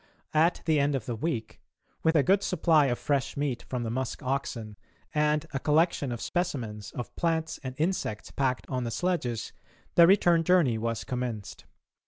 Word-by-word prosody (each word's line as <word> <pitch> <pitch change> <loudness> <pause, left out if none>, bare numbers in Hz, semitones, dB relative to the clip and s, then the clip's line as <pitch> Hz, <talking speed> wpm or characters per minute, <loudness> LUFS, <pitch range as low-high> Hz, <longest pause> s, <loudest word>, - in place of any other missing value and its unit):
At 160 +3 +3
the 160 -2 +3
end 140 0 +2
of 125 -5 -3
the 120 - -3
week, 115 -3 -3 0.4
with 160 +1 +2
a 150 - +5
good 195 +4 +4
supply 160 -6 +3
of 120 -2 0
fresh 140 -2 -1
meat 140 -4 -1
from 125 -2 -2
the 115 - -3
musk 130 +1 -3
oxen 125 -5 -3 0.4
and 150 0 +2
a 135 - -1
collection 150 -2 +2
of 120 - -4
specimens 115 - -3
of 120 - -6
plants 165 -1 -1
and 130 -1 -5
insects 155 - -2
packed 130 -2 -1
on 130 -2 -2
the 120 - -2
sledges, 125 -4 -2 0.4
the 170 -1 +7
return 175 -3 +5
journey 160 -10 +3
was 115 0 -2
commenced. 120 -5 -5
140 Hz, 175 wpm, -28 LUFS, 120-165 Hz, 0.4 s, the